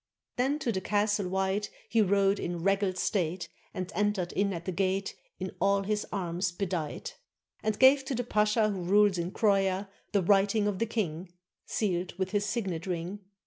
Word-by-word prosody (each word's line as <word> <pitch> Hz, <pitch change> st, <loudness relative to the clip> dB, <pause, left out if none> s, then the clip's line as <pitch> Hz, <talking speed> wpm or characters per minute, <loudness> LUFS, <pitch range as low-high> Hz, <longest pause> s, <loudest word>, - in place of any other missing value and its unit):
Then 265 Hz, +4 st, +1 dB
to 250 Hz, -6 st, -1 dB
the 190 Hz, -3 st, -2 dB
Castle 205 Hz, 0 st, +1 dB
White 190 Hz, +2 st, 0 dB, 0.2 s
He 225 Hz, -, +3 dB
rode 200 Hz, 0 st, +3 dB
in 175 Hz, -1 st, -3 dB
regal 195 Hz, -1 st, +2 dB
state, 180 Hz, -2 st, -1 dB, 0.2 s
And 185 Hz, +1 st, -5 dB
entered 205 Hz, -4 st, 0 dB
in 200 Hz, 0 st, +1 dB
at 170 Hz, -2 st, -5 dB
the 185 Hz, -, -1 dB
gate 190 Hz, +2 st, -1 dB, 0.2 s
In 185 Hz, 0 st, -4 dB
all 200 Hz, 0 st, +3 dB
his 210 Hz, +1 st, -1 dB
arms 180 Hz, -2 st, -1 dB
bedight, 180 Hz, -, -4 dB, 0.4 s
And 215 Hz, -1 st, -1 dB
gave 270 Hz, +1 st, +6 dB
to 270 Hz, -, -2 dB
the 245 Hz, -, -1 dB
pasha 215 Hz, -1 st, +2 dB
Who 190 Hz, -2 st, -4 dB
rules 200 Hz, +1 st, +4 dB
in 170 Hz, +1 st, -1 dB
Croia 195 Hz, -2 st, +1 dB, 0.2 s
The 200 Hz, -3 st, +2 dB
writing 200 Hz, +3 st, +3 dB
of 205 Hz, -2 st, -1 dB
the 230 Hz, -, +1 dB
king, 180 Hz, -5 st, -3 dB, 0.4 s
Sealed 185 Hz, -4 st, -1 dB
with 190 Hz, -1 st, -2 dB
his 205 Hz, 0 st, 0 dB
signet 195 Hz, -6 st, -2 dB
ring. 180 Hz, +3 st, -3 dB
195 Hz, 180 wpm, -29 LUFS, 185-210 Hz, 0.4 s, gave